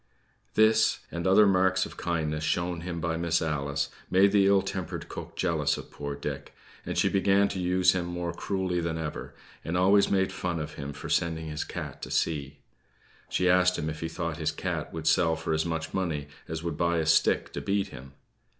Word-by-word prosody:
This, 110 +1 +4
and 85 +1 -2
other 100 +3 +7
marks 95 -1 +3
of - - -10
kindness 80 -3 -2
shown 85 +2 -1
him 85 -1 -4
by 80 0 -1
Miss 85 0 +1
Alice, 70 -2 -1 0.2
made 95 +2 +5
the 100 -1 +4
ill 100 -1 +4
tempered 90 -3 -4
cook - - -8
jealous - - +1
of - - -10
poor 70 -1 -5
Dick; 70 0 -6 0.3
and - - -3
she - - +3
began 100 +1 +3
to 95 - -4
use 90 0 +3
him 90 -1 -2
more 85 -1 -3
cruelly 95 -3 -1
than 80 -1 -2
ever, 80 -2 -5 0.3
and 85 +2 -2
always 100 +2 +5
made 95 -1 +2
fun 85 -2 -2
of 75 0 -5
him 70 0 -6
for - - -8
sending 80 -1 0
his 75 0 -3
cat - - -7
to - - -6
sea. 70 -3 -1 0.7
She 90 - +1
asked 90 0 +4
him 80 +1 -2
if 75 - -8
he 80 - -3
thought 85 -2 -3
his 80 -1 0
cat - - -3
would 80 -1 -6
sell 80 0 +3
for 80 0 -2
as 80 +2 0
much 80 -1 -3
money 80 -6 -2 0.2
as 80 0 -5
would 85 -3 -3
buy 85 0 +1
a 80 - 0
stick 80 +1 +3
to - - -4
beat 100 0 0
him. 65 +1 -11
85 Hz, 205 wpm, -28 LUFS, 80-90 Hz, 0.7 s, other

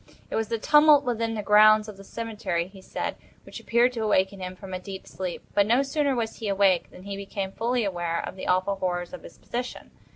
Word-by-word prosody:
It - - -2
was 225 -1 0
the 230 - -1
tumult 295 +3 +6
within 230 -2 -1
the 210 - -3
grounds 215 +1 +6
of 210 - -8
the 195 - -13
cemetery, 200 -6 -3
he 195 0 -14
said, - - -4 0.3
which - - -9
appeared 240 +2 +2
to 230 - -4
awaken 195 -2 +1
him 185 0 -6
from 190 0 -10
a 185 - -3
deep 190 +1 -8
sleep, 185 -2 -5
but 205 0 +3
no 245 +5 +4
sooner 280 0 0
was 230 -2 -3
he 225 - -5
awake 195 -3 +3
than 180 - -14
he 200 0 -5
became 195 -1 -4
fully 240 +3 0
aware 175 -4 -2
of - - -8
the 190 - -7
awful 185 +2 +1
horrors 175 0 -2
of 275 - -7
his - - -13
position. 245 +1 -6
205 Hz, 230 wpm, -26 LUFS, 190-230 Hz, 0.3 s, tumult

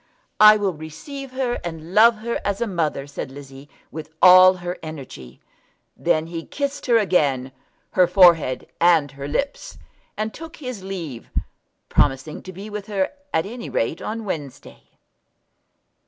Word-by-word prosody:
"I 215 0 +9
will 200 -3 -1
receive 250 - -9
her 255 -2 -1
and 165 0 -7
love 230 +3 +6
her 235 - -2
as 200 0 -1
a 235 - 0
mother," 165 -8 -2
said 140 -2 -7
Lizzie, 135 0 -12 0.2
with 155 0 -8
all 185 0 +8
her 180 0 -6
energy. 135 - -10 0.5
Then 155 0 +1
he 165 0 -6
kissed 285 - -4
her 235 -2 +5
again, 145 - +1 0.4
her 180 -1 +4
forehead 170 -8 +4 0.2
and 165 -5 +4
her 140 0 -7
lips, 275 - -3 0.4
and 215 +1 -3
took 325 +1 -10
his 255 -9 -7
leave, 170 -11 -7 0.6
promising 140 +2 0
to 185 - -9
be 195 +3 -9
with 210 -1 -7
her 195 -3 -1 0.2
at 160 - +1
any 235 +3 -7
rate 115 +8 -2
on 225 0 -5
Wednesday. 150 -8 -7
180 Hz, 150 wpm, -22 LUFS, 150-215 Hz, 0.6 s, I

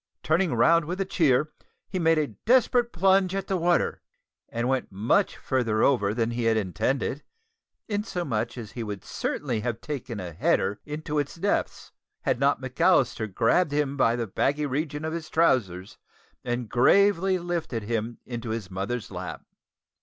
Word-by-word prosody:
Turning 160 -2 +2
round 165 +8 +4
with 180 +4 -4
a 195 - 0
cheer, 155 -5 +2 0.4
he 185 - -3
made 165 -1 +3
a 155 - +2 0.2
desperate 245 -1 +4
plunge 190 +1 +3
at 195 -1 -2
the 195 - -1
water 175 0 +1 0.5
and 120 +1 -2
went 130 -3 -1
much 110 - +1
farther 115 -5 0
over 110 -7 +3
than 115 +1 0
he 120 0 -2
had 115 -1 +3
intended, 110 - -1 0.7
insomuch 175 - -2
that 115 -5 -8
he 120 - -6
would 105 -3 -5
certainly 125 0 -2
have 115 0 -3
taken 125 -7 -5
a 90 -3 -6
"header" 95 +5 +1
into 150 0 -3
its 145 -1 -3
depths, 200 +4 -2 0.3
had - - 0
not - - +2
McAllister 110 -2 +1
grasped 145 - +2
him 145 -1 0
by 120 -4 +3
the 120 -1 -2
baggy 145 +8 0
region 150 +2 -2
of 160 - -3
his 165 -2 -5
trousers 105 - +1 0.4
and 120 -1 -2
gravely 190 - +4
lifted 170 -10 -3
him 115 +1 -3
into 120 -1 -5
his 110 -4 -4
mother's 100 +5 -4
lap. - - -6
135 Hz, 160 wpm, -26 LUFS, 115-170 Hz, 0.7 s, round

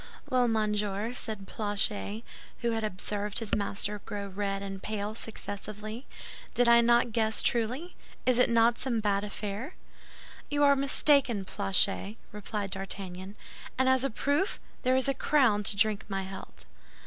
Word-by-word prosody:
"Well, 250 -1 +4
monsieur," 210 0 0
said 215 -5 -3
Planchet, 205 +1 -2 0.4
who 235 -1 +1
had 225 -1 -1
observed 205 0 -2
his 225 -3 0
master 205 0 -1
grow 205 -1 -5
red 195 0 -2
and 195 -1 -6
pale 210 0 -3
successively, 215 +1 -7 0.5
"did 245 0 +4
I 235 0 +7
not 235 0 +3
guess 220 -1 +3
truly? 250 +10 -1 0.3
Is 250 -1 +3
it 250 - +5
not 230 0 +4
some 245 -4 0
bad 200 -2 +1
affair?" 210 - -5 0.7
"You 290 0 +1
are 280 -1 +6
mistaken, 275 -6 +4
Planchet," 195 +2 +1
replied 205 -1 -4
D'Artagnan; 190 0 -6 0.4
"and 260 0 +2
as 260 0 +4
a 275 - +1
proof, 285 - 0 0.2
there 255 +1 +2
is 260 +1 +1
a 275 - +2
crown 260 -6 +3
to 200 - +2
drink 210 0 +2
my 195 -1 -2
health." 190 0 -10
215 Hz, 150 wpm, -29 LUFS, 200-240 Hz, 0.7 s, I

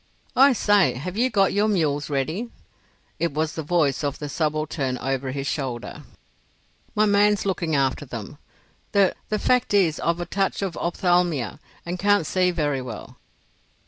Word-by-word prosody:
"I 270 +1 +6
say, 205 - +3
have 175 +9 -5
you 245 +4 +2
got 195 -5 +2
your 205 +1 +2
mules 155 -8 0
ready?" 155 - -2 0.7
It 170 -3 0
was 155 0 0
the 160 - -4
voice 155 -3 +1
of 140 -2 -2
the 150 - -6
subaltern 155 -4 -1
over 135 +1 -2
his 135 +1 -4
shoulder. 130 -5 -4 0.9
"My 215 - +4
man's 205 0 +3
looking 170 -5 -1
after 135 +1 0
them. 115 -6 -8 0.5
The—the 200 +2 +1
fact 250 -2 +1
is 170 -6 +3
I've 170 +1 0
a 175 - -3
touch 195 +1 -1
of 185 -4 -3
ophthalmia 175 - 0 0.3
and 175 +1 -4
can't 205 -3 +3
see 180 +3 +2
very 145 -6 -1
well. 120 -4 -8
165 Hz, 155 wpm, -24 LUFS, 140-195 Hz, 0.9 s, I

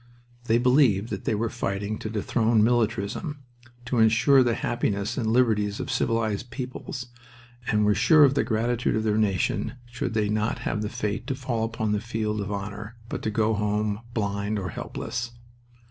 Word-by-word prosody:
They 115 0 +3
believed 120 -4 +3
that 100 - -4
they 110 - +1
were 115 +3 0
fighting 100 -1 -3
to 110 - -5
dethrone 110 +1 +2
militarism, 120 - 0 0.4
to 125 -1 0
insure 115 +5 +5
the 120 -2 +2
happiness 100 -4 -1
and 110 -4 0
liberties 110 -4 +2
of - - -3
civilized 115 0 0
peoples, 125 +1 -6 0.6
and 105 -1 +2
were 105 - +4
sure 150 - +6
of 135 -2 +5
the 140 - +2
gratitude 120 +1 0
of 110 - 0
their 110 0 +1
nation 100 0 0
should 120 -1 -4
they 105 -2 +2
not 105 +2 0
have 105 - -1
the 105 - -2
fate 105 -1 -3
to 135 - -1
fall 125 -4 -2
upon 110 -1 -1
the 105 -1 0
field 110 -3 -2
of 100 +1 -4
honor, 105 +3 -5
but 110 - -3
go 110 0 +2
home 105 0 0 0.2
blind 100 0 -1
or 95 -2 -3
helpless. 120 +1 -5
110 Hz, 175 wpm, -26 LUFS, 105-120 Hz, 0.6 s, sure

